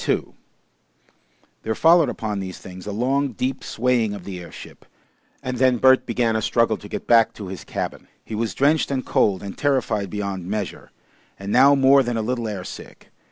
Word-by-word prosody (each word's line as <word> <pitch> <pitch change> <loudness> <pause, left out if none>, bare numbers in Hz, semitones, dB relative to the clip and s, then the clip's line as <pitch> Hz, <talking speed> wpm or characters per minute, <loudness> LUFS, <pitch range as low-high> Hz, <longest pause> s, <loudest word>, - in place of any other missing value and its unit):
2 - - -1 1.3
There 110 0 -2
followed 165 -1 +5
upon 105 -4 -3
these 95 -1 -6
things 95 +1 -11
a - - -3
long, 130 +5 0
deep 130 +3 -3
swaying 115 -3 0
of 100 - -9
the 95 -1 -7
airship, 85 - -12 0.6
and 125 0 -3
then 130 0 +3
Bert 130 +2 +4
began 115 -1 0
a 110 - 0
struggle 115 0 +2
to 105 - -12
get - - -5
back 115 -2 +4
to 100 -4 -8
his 95 - -7
cabin. - - -5 0.2
He - - -8
was 110 +1 -2
drenched 145 +3 +2
and 135 -2 -2
cold 95 -3 +1
and 100 - -7
terrified 125 -8 0
beyond 100 -3 -4
measure, 105 -1 -4 0.5
and 100 +1 -6
now 135 +4 +6
more 135 0 +5
than 120 -2 -2
a 110 - -1
little 120 0 -2
air 100 -4 -5
sick. - - -11
115 Hz, 190 wpm, -22 LUFS, 100-130 Hz, 1.3 s, now